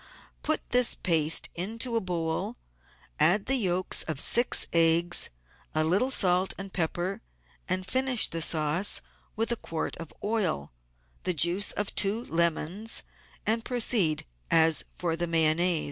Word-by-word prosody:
Put 310 0 -2
this 245 -1 +5
paste 160 -3 +1
into 230 +7 -3
a 230 - 0
bowl, 165 -3 -3 0.6
add 195 +4 +3
the 270 - +1
yolks 185 -7 +1
of 155 -4 -4
six 240 +9 +5
eggs, 170 +1 +4 0.5
a 155 - +2
little 195 +11 +1
salt 185 -6 +2
and 195 -1 -8
pepper, 175 +2 -3 0.5
and 185 0 -1
finish 255 +3 +1
the 165 - -5
sauce 160 +5 +1 0.3
with 225 +2 -1
one 235 - -2
quart 165 -1 -5
of 165 -2 -8
oil, 205 - -2 0.5
the 180 -1 -1
juice 175 +6 +2
of 205 -1 -3
two 210 +4 0
lemons, 170 +6 0 0.4
and 225 +1 0
proceed 225 -11 +1 0.2
as 160 -1 +3
for 170 -2 -2
the 175 +1 -2
Mayonnaise. 165 +1 +2
180 Hz, 140 wpm, -27 LUFS, 165-220 Hz, 0.6 s, this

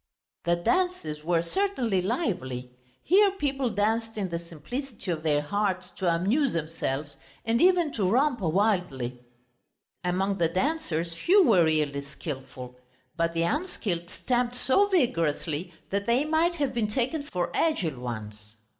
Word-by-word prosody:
The 170 0 +3
dances 175 - 0
were 170 0 +1
certainly 240 - 0
lively. 175 - -2 0.3
Here 400 +4 +5
people 275 -8 -1
danced 225 +2 0
in 195 -3 -2
the 170 -1 -2
simplicity 190 - -6
of 160 -2 -2
their 150 -2 +1
hearts 195 +1 -1
to 180 -3 +1
amuse 215 - +2
themselves 150 -3 -3 0.3
and 230 +2 +2
even 350 -4 +4
to 195 -5 +1
romp 255 +3 +2
wildly. 170 - 0 0.8
Among 190 +2 0
the 170 - +4
dancers 180 - -1
few 370 - +4
were 185 - +5
really 150 -3 0
skilful, 130 -3 -8 0.4
but 165 0 0
the 165 - +2
unskilled 190 - -2
stamped 245 -1 -1
so 265 +11 +3
vigorously 170 - 0 0.2
that 200 +2 -1
they 245 +5 +3
might 320 +3 +2
have 285 -4 -1
been 230 -3 0
taken 260 +7 0
for 180 -11 -3
agile 180 - 0
ones. 110 -2 -7
190 Hz, 140 wpm, -27 LUFS, 160-260 Hz, 0.8 s, Here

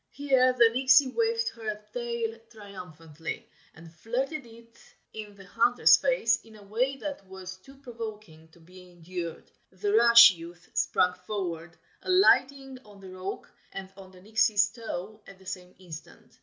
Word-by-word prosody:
Here 265 -3 +2
the 240 -2 +5
Nixie 260 +3 +4
waved 460 - 0
her 215 -2 -6
tail 235 -2 -3
triumphantly, 165 -7 -9 0.3
and 160 0 -14
flirted 255 - -4
it 230 0 -17 0.4
in 210 -2 -9
the 195 -1 -14
hunter's 240 +6 +4
face 240 - +1
in 220 -1 -17
a 210 - -15
way 245 +7 -1
that 285 -5 -6
was 185 0 -9
too 270 +9 -17
provoking 215 - -9
to 160 +1 -23
be 180 +2 -16
endured. 175 -1 -8 0.2
The 200 +2 -3
rash 235 0 +9
youth 175 0 -12
sprang 180 0 +1
forward, 175 -3 -6 0.2
alighting 275 -8 +2
on 205 -2 -17
the 190 -1 -11
rock 185 +1 -7 0.2
and 190 0 -8
on 190 -1 -13
the 185 -1 -17
Nixie's 215 0 +2
toe 215 -2 -7
at 195 - -13
the 190 - -20
same 180 -1 -8
instant. 170 -4 -13
210 Hz, 155 wpm, -27 LUFS, 185-240 Hz, 0.4 s, rash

